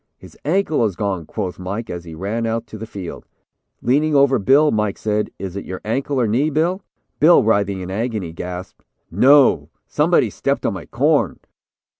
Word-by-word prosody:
'His - - -15
ankle 160 -4 +1
is 100 -5 -2
gone,' 95 -5 -3
quoth 95 -5 -4
Mike, 100 +5 -4
as 85 -1 -6
he 80 -1 -9
ran 110 +6 -2
out 115 +1 -2
to 110 - -10
the 110 - -7
field. 95 -5 -8 0.6
Leaning 145 +5 +2
over 140 -2 +4
Bill, 140 +8 +4
Mike 105 -2 0
said: 105 0 -1
'Is 95 -1 -6
it 100 - -4
your 95 - -6
ankle, 135 +5 -1
or 120 - +2
knee, 130 +8 +1
Bill?' 170 +6 0 0.4
Bill, 165 +4 +6
writhing 100 -3 +1
in 90 0 -6
agony, 105 -4 -3
gasped: 90 +1 -7 0.3
"'No; 135 - +5 0.2
somebody - - +2
stepped - - -2
on - - +1
my - - -8
corn.'" - - +1
110 Hz, 180 wpm, -20 LUFS, 95-135 Hz, 0.6 s, Bill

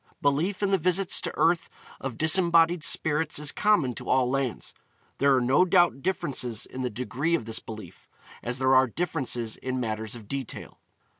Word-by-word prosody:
Belief 160 +9 0
in 200 - +1
the 195 - +3
visits 180 +2 +2
to - - -2
earth 170 +1 +2 0.3
of 130 -4 -6
disembodied 165 0 +3
spirits 160 -2 +1
is 150 -1 +1
common 190 -12 +2
to - - -8
all 130 -1 +3
lands. 130 -1 -2 0.5
There 140 0 +4
are 130 - +2
no 130 +8 +3
doubt 175 -6 +3
differences 135 - -2
in 130 - -8
the 125 - -1
degree 125 +8 -2
of 120 - -4
this 115 0 -2
belief, 105 -5 -11 0.3
as 120 +1 -3
there 130 0 +2
are 130 0 +5
differences 130 -6 -2
in 130 0 -4
matters 110 -1 -3
of 110 -4 -12
detail. 135 -1 -6
135 Hz, 175 wpm, -26 LUFS, 125-170 Hz, 0.5 s, are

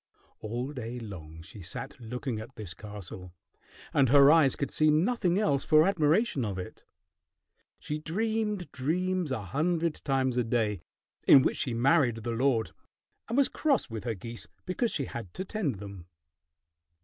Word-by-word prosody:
All 120 +6 -4
day 125 -2 -5
long 80 -8 -9
she 100 +5 -11
sat 135 +11 -6
looking 125 0 -4
at 110 - -10
this 100 -5 -7
castle, 95 -3 -9 0.6
and 135 -3 +4
her 140 +1 +8
eyes 155 -5 +5
could 140 - -3
see 155 0 +3
nothing 180 +3 +2
else 145 -10 +1
for 155 +1 +5
admiration 165 - +2
of 100 -4 -3
it. 90 - -8 0.9
She 150 0 -4
dreamed 210 +3 -2
dreams 180 +4 -1
a 110 -5 -2
hundred 160 - 0
times 130 -3 +1
a 125 - +3
day, 110 -5 0 0.5
in 135 - +9
which - - 0
she 125 -4 -1
married 120 -3 +3
the 120 - -2
lord, 115 -1 +1 0.6
and 235 - -1
was 280 - +5
cross 280 - 0
with 110 0 -5
her 115 -2 -1
geese 115 +5 -8 0.2
because 205 +6 0
she 140 - -1
had 115 -8 -8
to 190 - -4
tend 195 - -2
them. 100 -3 -9
135 Hz, 160 wpm, -29 LUFS, 110-165 Hz, 0.9 s, in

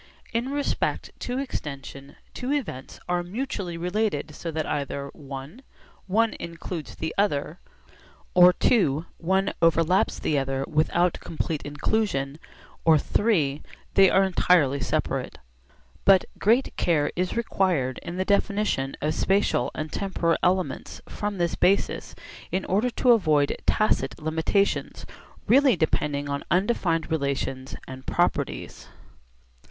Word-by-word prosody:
In 235 +3 -1
respect 285 0 -1
to 250 +1 -3
extension 140 - -6 0.2
two 255 +2 -4
events 220 - -4
are 180 0 +1
mutually 190 -2 -4
related 180 -3 -1
so 165 - -6
that 160 -1 -2
either 140 -1 -3
(i) 140 - -9 0.5
one 220 +4 +2
includes 170 -1 -6
the 160 - -4
other, 165 -4 0 0.7
or 180 0 +7
(ii) 160 - +3 0.2
one 190 +3 +1
overlaps 165 +2 +3
the 150 -2 0
other 135 0 -2
without 170 +2 +1
complete 160 -1 -3
inclusion, 145 -2 -1 0.4
or 160 -1 +6 0.2
(iii) 155 -10 +1 0.3
they 195 -1 +7
are 195 - +4
entirely 170 -6 +3
separate. - - -2 0.7
But 195 -2 +6
great 235 +6 +2
care 150 -4 +2
is 180 +5 -1
required 180 - 0
in 175 +1 -6
the 185 - 0
definition 200 -9 0
of 155 +1 0
spatial 195 +5 +1
and 155 0 -4
temporal 175 -4 0
elements 185 0 -1
from 205 -1 -4
this 170 -1 0
basis 195 +2 +1 0.4
in 190 - -1
order 210 +7 +1
to 245 +1 +3
avoid 155 -10 +3
tacit 215 0 +1
limitations 160 +6 0 0.4
really 270 -1 +5
depending 145 -3 0
on 140 0 -3
undefined 175 -4 +1
relations 140 -3 -2
and 130 0 -10
properties. - - -1
175 Hz, 125 wpm, -25 LUFS, 145-200 Hz, 0.7 s, or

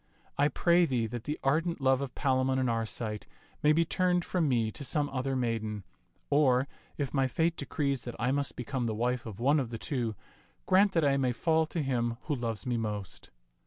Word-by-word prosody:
I 145 - +3
pray 170 +4 +3
thee 125 -5 0
that 115 +1 -6
the 150 +1 -3
ardent 165 +5 +1
love 135 -1 +3
of 135 -3 -5
Palamon 130 -1 +1
and 130 -2 +1
Arcite 110 -1 -3 0.3
may 150 - +5
be 165 +2 +3
turned 180 +1 +1
from 170 -5 +1
me 115 -4 +1
to 140 - -7
some 145 +1 0
other 135 0 -2
maiden; 110 -4 -2 0.5
or, 140 -2 +4 0.3
if 140 -3 -2
my 135 -2 +2
fate 165 +6 +1
decrees 140 -1 -2
that 120 - -5
I 125 - 0
must 140 0 -1
become 125 0 -2
the 110 - -2
wife 125 +1 -1
of 105 -1 -8
one 140 +5 +3
of 130 -4 -2
the 115 - -5
two, 115 -3 -2 0.5
grant 190 +1 +4
that 165 -3 +3
I 140 -1 +3
may 130 -2 +1
fall 160 +4 +2
to 165 -1 -2
him 120 -3 -1
who 150 - -2
loves 115 -3 -3
me 125 -2 0
most." 105 -4 -4
130 Hz, 205 wpm, -30 LUFS, 120-150 Hz, 0.5 s, may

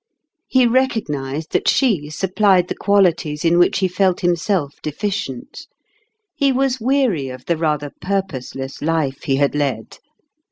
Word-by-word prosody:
He 260 -1 +3
recognized 160 - -1
that - - 0
she 195 - +2
supplied 190 +2 +2
the - - -3
qualities 175 -6 +1
in 170 +1 +4
which 175 - +3
he 190 -1 +2
felt 185 0 0
him 175 0 +3
self 165 -4 -2
deficient; 150 - -4 0.7
he 280 -2 +2
was 260 -1 0
weary 245 - +1
of 130 0 -10
the 170 - +1
rather 150 -3 -1
purposeless 145 -9 -4
life 150 -3 -1
he 135 - +1
had 140 +1 +1
led. 140 -7 -3
170 Hz, 145 wpm, -19 LUFS, 145-205 Hz, 0.7 s, in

